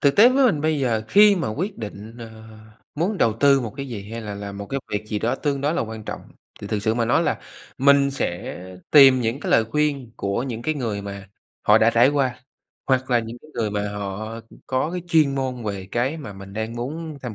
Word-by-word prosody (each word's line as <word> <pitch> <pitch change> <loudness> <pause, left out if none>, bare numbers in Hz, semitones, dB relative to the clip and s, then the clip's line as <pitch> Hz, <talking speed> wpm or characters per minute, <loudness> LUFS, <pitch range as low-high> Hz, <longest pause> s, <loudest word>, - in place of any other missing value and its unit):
Thực 140 -1 +3
tế 225 +4 +9
với 265 +1 +3
mình 155 -11 +1
bây 155 -1 +1
giờ, 115 -4 0
khi 205 0 +6
mà 165 - -1
quyết 190 - -3
định, 110 +1 -8
ờ, 115 -1 -8 0.6
muốn 185 +7 -1
đầu 115 - +3
tư 140 +4 +4
một 115 -4 -5
cái 140 -1 -5
gì 105 -4 -7
hay 115 - -4
là 105 -2 -6
làm 100 0 -7
một 100 - -6
cái 135 +4 -3
việc 105 +1 -2
gì 105 - -1
đó 120 +5 0
tương 140 -1 -2
đối 150 +4 0
là 175 - 0
quan 110 -1 -7
trọng, - - -5 0.4
thì - - -6
thực 105 - -1
sự 110 0 +1
mà 115 - +1
nói 115 - +3
là - - 0 0.4
mình 140 +1 +5
sẽ 90 -13 -4 0.3
tìm 135 -3 +8
những 115 +4 -1
cái - - -3
lời 115 - +5
khuyên 140 -1 -1
của 100 +4 -1
những 120 -3 -5
cái 155 +3 0
người 110 -7 -3
mà 100 0 -8 0.3
họ 105 +1 +6
đã 115 +1 +4
trải 120 +3 +5
qua, 135 -4 0 0.5
hoặc 130 -1 +1
là 120 - +4
những 115 +1 -6
cái 155 - -16
người 110 -3 -1
mà 105 0 -2
họ 105 +3 -5 0.3
có 130 +4 0
cái 180 +1 -3
chuyên 155 -4 +3
môn 130 -3 -3
về 100 -3 -4
cái 130 +6 0
mà 140 -10 -8
mình 95 0 -11
đang 110 +3 -4
muốn 150 +5 -5
tham 120 -4 -5
120 Hz, 240 wpm, -23 LUFS, 110-140 Hz, 0.6 s, tế